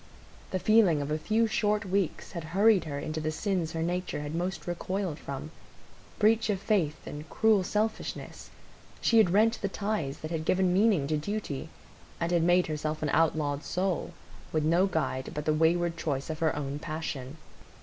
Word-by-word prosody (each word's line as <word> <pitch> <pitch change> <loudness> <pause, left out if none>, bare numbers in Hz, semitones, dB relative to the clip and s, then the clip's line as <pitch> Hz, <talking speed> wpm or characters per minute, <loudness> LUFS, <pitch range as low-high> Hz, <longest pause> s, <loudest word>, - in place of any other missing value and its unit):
The 185 - -1
feeling 200 -5 +4
of 145 +1 -3
a 155 - 0
few 220 +7 +2
short 210 -1 +1
weeks 190 -3 -1
had 170 -3 -5
hurried 205 -2 +5
her 145 -2 -4
into 155 +2 -3
the 155 - -1
sins 175 -2 -1
her 165 0 -1
nature 180 -2 -2
had 150 +1 -5
most 175 +2 -3
recoiled 180 -1 -3
from,—breach 210 +9 -2
of 200 -2 +1
faith 185 -7 +1
and 150 +2 -8
cruel 220 -3 +3
selfishness; 215 +4 -3 0.5
she 230 - +4
had 215 - +5
rent 220 +5 +3
the 200 - -1
ties 200 -9 -2
that 155 - -5
had 160 -2 -2
given 185 +2 +2
meaning 195 -6 +3
to 155 +2 0
duty, 160 -4 -4 0.5
and 170 0 -1
had 170 -1 +3
made 175 +2 +4
herself 155 0 -3
an 150 - 0
outlawed 150 -2 +1
soul, 185 -1 -1 0.4
with 155 -1 +1
no 170 +5 +3
guide 160 -7 -2
but 150 0 -3
the 155 - +3
wayward 165 +2 +2
choice 145 -1 -2
of 155 - -6
her 160 -2 +1
own 145 0 -3
passion. 155 -3 -5
170 Hz, 180 wpm, -29 LUFS, 155-200 Hz, 0.5 s, hurried